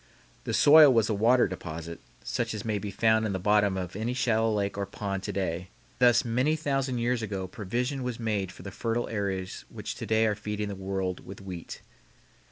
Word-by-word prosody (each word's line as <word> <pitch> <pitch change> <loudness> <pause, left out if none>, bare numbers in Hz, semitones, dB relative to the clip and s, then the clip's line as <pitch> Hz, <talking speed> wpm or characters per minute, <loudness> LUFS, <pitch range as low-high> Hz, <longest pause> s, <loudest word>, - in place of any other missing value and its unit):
The - - -2
soil 150 -1 +8
was 115 -3 +3
a - - +2
water 120 +5 +4
deposit, 85 0 -7 0.2
such 115 -3 -2
as 105 - -6
may 105 -2 0
be 105 - -5
found 110 +3 +2
in 105 -2 -1
the 95 - -2
bottom 105 0 +3
of 90 -1 -5
any 115 +4 -2
shallow 115 -3 +2
lake 100 -2 -1
or 100 -1 -3
pond 100 0 -4
to - - -4
day, 95 -4 -1
and 90 - -12 0.3
thus 120 -2 +5
many 125 +7 +1
thousand 135 -4 -1
years 120 0 0
ago 100 -3 -3
provision 120 +9 -3
was 125 -2 -4
made 105 -5 -1
for - - -13
the 100 - -7
fertile 115 +4 -2
areas 95 -3 -3
which - - -6
to - - -6
day 110 +1 +3
are 110 - +2
feeding 105 0 -4
the 100 - -4
world 95 -1 -3
with 95 - -10
wheat. 95 -4 -8
105 Hz, 210 wpm, -28 LUFS, 95-120 Hz, 0.3 s, soil